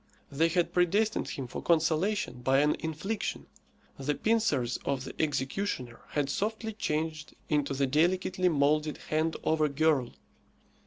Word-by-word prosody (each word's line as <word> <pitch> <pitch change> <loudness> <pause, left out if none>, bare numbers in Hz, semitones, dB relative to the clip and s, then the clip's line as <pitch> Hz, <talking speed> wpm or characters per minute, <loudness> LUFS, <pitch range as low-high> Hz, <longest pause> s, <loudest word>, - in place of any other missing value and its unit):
They 155 +4 +3
had 175 +1 +1
predestined 200 +5 +2
him 135 - -4
for 120 - -6
consolation 165 -3 +1
by 135 +2 +3
an 150 +1 +3
infliction. 160 +7 -3 0.5
The 145 +2 -1
pincers 185 - +1
of 135 -2 -2
the - - -7
executioner 135 -3 -2
had 145 -2 +1
softly 220 +4 -2
changed 155 -5 -3
into 145 -2 +1
the 140 +1 +2
delicately 180 +5 +2
moulded 150 0 +2
hand 160 +1 -1
of 160 0 +1
a 150 - +3
girl. 140 -3 +1
155 Hz, 140 wpm, -30 LUFS, 140-180 Hz, 0.5 s, They